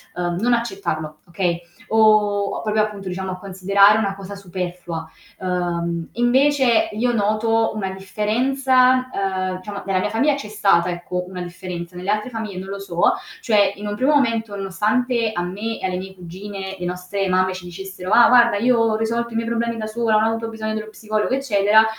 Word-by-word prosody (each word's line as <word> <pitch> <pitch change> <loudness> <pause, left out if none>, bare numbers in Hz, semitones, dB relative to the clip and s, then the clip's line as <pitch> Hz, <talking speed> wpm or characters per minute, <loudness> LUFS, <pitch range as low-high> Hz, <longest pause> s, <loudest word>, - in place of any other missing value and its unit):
uhm, 175 -1 -2
non 240 +2 +2
accettarlo, 195 - -2
okay, 170 0 -1 0.3
o 215 -2 +5 0.2
o - - -4
proprio, 215 0 +1
appunto, 205 -3 -3
diciamo 190 +1 -4
a 185 - -5
considerare 200 +2 +4
una 195 -2 -1
cosa 200 +1 -8
superflua. 175 -3 -5 0.3
Uhm, 170 -2 -2
invece 260 0 +3
io 240 +3 0
noto 225 +1 +1
una 195 -3 -2
differenza 255 +6 +2
ehm, 185 -1 -1
diciamo 200 +2 -7
nella 190 -1 +1
mia - - -1
famiglia 280 +6 +2
c'è 245 -7 -6
stata, 195 -4 +2
ecco, 180 +1 -4
una 180 -1 -6
differenza, 175 0 -7
nelle 180 +3 -5
altre 210 +4 0
famiglie 215 -4 -5
non 190 +1 -6
lo 200 0 -5
so, 175 -3 +2 0.3
cioè 205 -3 +3
in 205 - -8
un 205 - -2
primo 270 +5 +2
momento 225 -6 +1
nonostante 220 +4 0
a 175 - -1
me 210 +5 -4
e - - -4
alle 180 -1 -1
mie 190 +1 -7
cugine, 190 +2 -7
le 180 - -4
nostre 180 +2 -3
mamme 185 0 +2
ci 185 -1 -8
dicessero: 190 +1 -7
"Ah, 235 -1 +7
guarda 235 -4 +6
io 245 +2 +3
ho 225 -1 +2
risolto 230 +1 -1
i - - -6
miei 230 0 -1
problemi 235 0 -1
da 215 -1 -4
sola, 225 0 0
non 215 0 +4
ho - - +3
avuto 225 0 -3
bisogno 220 -1 -4
dello 215 0 -4
psicologo 215 +2 -2
eccetera." 220 -5 +4
205 Hz, 190 wpm, -21 LUFS, 185-225 Hz, 0.3 s, Ah